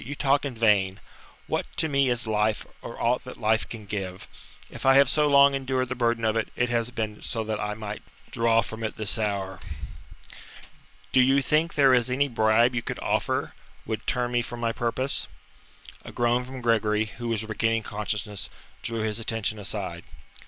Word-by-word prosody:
"You 140 +5 -6
talk 140 0 +2
in 135 -4 -4
vain. 100 -4 +2 0.5
What - - -2
to 160 - +2
me 140 -3 +2
is 120 -1 0
life, 110 0 0 0.2
or 115 - -8
aught 120 +2 +1
that 125 - -9
life 110 0 +1
can 110 -3 -8
give? 95 -2 -5 0.4
If - - -9
I 135 0 +6
have 140 0 +7
so 150 +3 +3
long 140 0 +7
endured 130 -2 -1
the - - -1
burden 120 -2 0
of 110 0 +2
it, 115 - 0
it 120 0 +1
has 120 0 +1
been 110 -3 -4
so 115 - -2
that 110 -1 -3
I 105 0 -2
might 105 -1 -6 0.3
draw 115 0 +3
from 110 +1 -7
it 110 - -3
this 110 +1 0
hour. 100 -3 -2 1.5
Do 130 - +5
you 135 +2 +4
think 155 +3 +1
there 140 -3 +5
is 125 0 +3
any 140 +3 +2
bribe 115 0 +3
you 120 - -1
could - - -5
offer - - -1 0.3
would - - -4
turn 120 -1 0
me 120 0 +2
from 120 0 -7
my 115 -1 0
purpose?" 120 +4 -1 0.8
A - - -9
groan 120 +1 +1
from 130 0 -8
Gregory, 110 -2 +2
who 120 +2 -7
was 110 -2 -1
regaining 115 +1 0
consciousness, 105 -2 -3 0.3
drew 115 -1 -2
his 110 0 -1
attention 110 -1 -1
aside. 95 -4 -5
115 Hz, 190 wpm, -26 LUFS, 110-125 Hz, 1.5 s, have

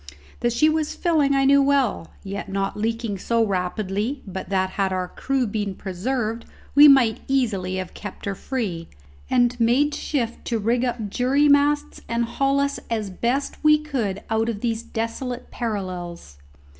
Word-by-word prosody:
That 240 0 +1
she 240 +6 +3
was 310 -1 0
filling 305 -6 +2
I 270 0 +3
knew 280 +1 +6
well, 275 -11 +1 0.2
yet 200 +1 -5
not 195 0 -2
leaking 225 -1 -2
so 230 +3 +1
rapidly 200 +6 -2
but 190 -2 -6
that, 190 -1 0
had 195 -1 0
our 185 -1 -1
crew 270 -2 -1
been 205 -2 -3
preserved, 220 +5 -3 0.3
we 290 +2 +9
might 250 -5 +5
easily 215 -9 0
have 185 -1 -4
kept 205 - -8
her 200 - -1
free, 195 -8 -4 0.4
and 245 0 +2
made 255 +6 +3
shift 240 -7 -2
to 235 - 0
rig 235 +3 +1
up 230 -5 -2
jury 270 +6 +3
masts 290 +1 +2
and 235 0 +1
haul 275 +3 +1
us 280 0 0
as 215 -4 -2
best 245 +11 -2
we 305 0 +6
could 240 -10 -3
out 225 +1 +1
of 210 -3 -4
these 230 -2 -1
desolate 235 +2 -4
parallels. 180 - -5
230 Hz, 165 wpm, -23 LUFS, 200-270 Hz, 0.4 s, we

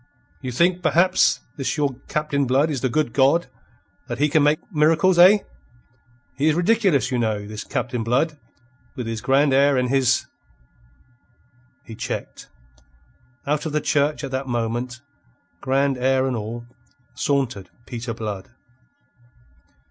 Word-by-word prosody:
"You 130 -2 -4
think, 175 +8 +2
perhaps, 170 -4 +3 0.2
this 135 +3 -2
your 145 -2 0
Captain 145 -3 -1
Blood 140 +5 +2
is 135 -4 -3
the 130 - 0
good 145 -1 -1
God. 140 +5 +3 0.6
That - - -4
he 150 +3 +2
can 155 +1 +3
make 150 +1 +3 0.2
miracles, 165 +4 +3
eh? 195 +4 +7 0.9
He 140 +3 0
is 155 - +3
ridiculous, 185 - +2
you 125 - 0
know, 110 -3 -1
this 105 0 -7
Captain 125 -1 -3
Blood; 135 +7 +1 0.6
with 125 -4 -5
his 115 -1 -4
grand 135 +3 +3
air 140 0 +4
and 125 -1 0
his...." 130 -2 +2 1.6
He 115 - -10
checked. 120 +2 -6 1.0
Out 150 +2 -1
of 150 - -5
the 150 - +2
church 150 0 0
at 135 - -5
that 135 +1 -3
moment, 120 0 -3 0.6
grand 135 0 +1
air 130 +1 +2
and 130 -2 -1
all, 115 +2 -6 0.5
sauntered 125 -10 -1 0.2
Peter 120 -1 -5
Blood. 105 -4 -6
135 Hz, 140 wpm, -22 LUFS, 120-150 Hz, 1.6 s, eh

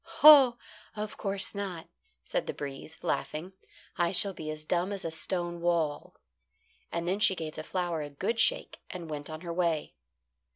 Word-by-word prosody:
"Oh! 275 -6 +10 0.4
of 210 0 -4
course 195 -1 -2
not," 195 -5 -5 0.4
said - - -2
the - - -3
breeze, 140 +2 -7
laughing. 170 +5 -2 0.5
"I 170 -1 +3
shall 195 +1 0
be 155 -3 -6
as 155 0 -6
dumb 175 +4 0
as 200 -3 -4
a 165 - -2
stone 175 +1 -2
wall." 165 -4 0 0.8
And 170 0 -2
then 190 +3 0
she 210 -2 +5
gave 160 -3 -5
the 155 - -6
flower 175 -2 -2
a 145 - -5
good 200 +11 -2
shake - - +2
and 170 -3 -7
went 145 0 -5
on 155 0 -6
her 170 -2 -4
way. 170 -3 0
175 Hz, 175 wpm, -30 LUFS, 155-195 Hz, 0.8 s, Oh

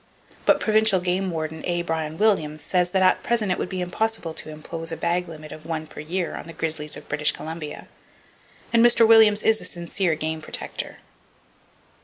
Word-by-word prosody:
But - - +5
Provincial 215 -3 +3
Game 180 +2 -1
Warden 160 -1 -4
A. 175 -1 -1
Bryan 160 -2 -3
Williams 155 -8 +1
says 180 +1 +1
that 190 +1 +2
at 185 - +4
present 225 -5 0
it 180 - 0
would - - -2
be 185 -1 -3
impossible 180 -1 -1
to 155 - -8
impose 165 +2 -6
a 165 - -4
bag 175 +1 0
limit 155 -2 -10
of 155 - -9
one 160 -1 -4
per - - -12
year 170 +4 -2
on - - -8
the 165 - -9
grizzlies 160 -2 -2
of - - -12
British 150 0 +1
Columbia; 160 -1 -7 0.9
and 230 0 +6
Mr. 235 -1 +6
Williams 220 -2 +6
is 220 0 +4
a - - -6
sincere 175 0 -1
game 155 +1 -3
protector. - - -5
170 Hz, 190 wpm, -24 LUFS, 160-195 Hz, 0.9 s, and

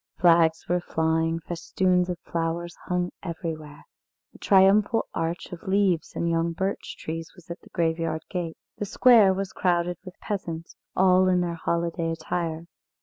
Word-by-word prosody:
Flags 165 -2 +4
were 180 +1 +1
flying, 160 0 0
festoons 180 +2 0
of 180 - -2
flowers 170 +1 -3
hung 180 -1 -1
everywhere. 160 -4 -6 0.5
A - - -16
triumphal 200 +4 +4
arch 165 +1 -3
of 175 - -8
leaves 190 -4 +1
and 170 - -1
young 165 0 +1
birch 190 +4 -3
trees 165 +1 -6
was 175 -2 -13
at 170 - -6
the - - -18
graveyard 165 -1 -1
gate. 175 -3 -4 0.2
The 205 - -1
square 220 -2 +6
was 190 0 -3
crowded 175 -1 0
with 185 -2 -10
the - - -48
peasants, 165 -5 -5 0.2
all 185 0 +5
in 180 -1 +3
their 175 -1 -1
holiday 170 0 -1
attire. 165 0 -3
170 Hz, 155 wpm, -26 LUFS, 165-185 Hz, 0.5 s, square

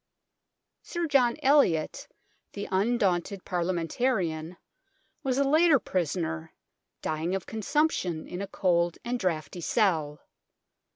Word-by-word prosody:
Sir 345 -1 -3
John 260 -6 +3
Eliot, 265 - +3 0.5
the 200 - -5
undaunted 195 -2 +1
Parliamen 175 -2 -1
tarian, 175 -9 -1 0.6
was 260 -1 -1
a 280 - +4
later 310 +2 +5
prisoner, 165 - -2 0.5
dying 160 +4 -1
of 190 - -4
con 220 -1 -5
sumption 200 - 0
in 180 - -5
a 200 - -4
cold 175 -3 +1
and 245 +1 -1
draughty 170 -3 -2
cell. 160 -8 +1
185 Hz, 115 wpm, -28 LUFS, 165-245 Hz, 0.6 s, later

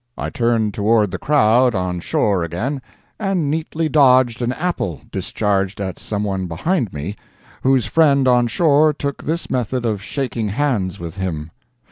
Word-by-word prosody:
I - - -4
turned 115 -3 +1
toward 105 -1 +2
the - - -4
crowd 125 -4 +3
on 90 -1 -2
shore 95 +1 0
again, 115 - -3 0.4
and 190 -8 0
neatly 160 +1 -2
dodged 130 -5 +4
an 120 0 0
apple 155 - -2
discharged 100 -2 -1
at 95 -3 -4
someone 100 -3 -2
behind 115 - -1
me, 75 +8 -5 0.5
whose 130 -3 +3
friend 140 +1 +3
on 125 -1 +4
shore 155 +2 +3
took 140 -1 -4
this 165 +2 -3
method 125 0 -1
of 105 -4 -1
shaking 125 -2 -3
hands 105 - -1
with 85 +2 -7
him. 80 -5 -4
120 Hz, 150 wpm, -19 LUFS, 100-140 Hz, 0.5 s, dodged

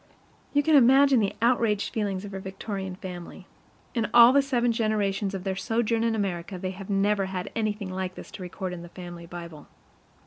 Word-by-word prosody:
You 290 0 +2
can 315 0 +4
imagine 270 0 +6
the 200 -3 0
outraged 230 -4 +2
feelings 200 -3 -2
of 200 - -8
her 195 - -5
Victorian 190 0 -5
family. 180 -2 -9 0.5
In 230 -3 -1
all 240 +1 +9
the 280 - +6
seven 245 -3 +1
generations 205 -3 0
of 185 - -5
their 190 -1 -2
sojourn 225 +2 0
in 230 -1 +1
America 185 -3 -3
they 185 +1 -3
have 190 +1 -9
never 200 0 +2
had 190 -1 -5
anything 210 -3 -2
like 185 -1 -3
this - - -10
to - - -9
record 185 +1 -5
in 175 - -7
the 175 - -10
family 175 -1 -9
Bible. 170 -3 -9
200 Hz, 195 wpm, -26 LUFS, 185-230 Hz, 0.5 s, all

